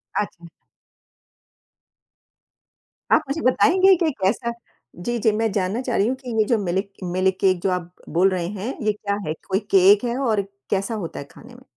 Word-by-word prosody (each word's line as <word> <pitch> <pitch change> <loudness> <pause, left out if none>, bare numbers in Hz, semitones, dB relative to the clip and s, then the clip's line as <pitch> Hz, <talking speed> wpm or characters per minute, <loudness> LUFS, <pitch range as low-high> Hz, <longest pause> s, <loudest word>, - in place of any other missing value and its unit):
अच्छा। 175 -4 -3 2.7
आप - - +6
मुझे 305 +4 -2
बताएँगे 370 +9 +5
कि 330 -2 +1
कैसा 215 +5 0 0.4
जी, 240 +8 -3
जी। 220 0 +3
मैं 220 +1 0
जानना 195 +4 -1
चाह 250 -2 -2
रही 200 - +3
हूँ 255 - 0
कि 260 -1 -10
ये - - +6
जो 235 - +3
मिल्क 195 +2 -2 0.2
मिल्क 185 +1 +1
केक 185 -2 +3
जो 195 - 0
आप 180 -1 -3 0.2
बोल 180 +5 +3
रहे 180 -3 -2
हैं, 205 +6 -4
ये 215 - +2
क्या 200 -1 -3
है? 155 - -1
कोई 190 0 +1
केक 195 +3 +6
है 240 +1 -1
और 225 -6 +1 0.3
कैसा 200 +3 -1
होता - - -7
है 140 - -7
खाने 240 +2 -15
में? 255 - -16
205 Hz, 185 wpm, -22 LUFS, 185-240 Hz, 2.7 s, आप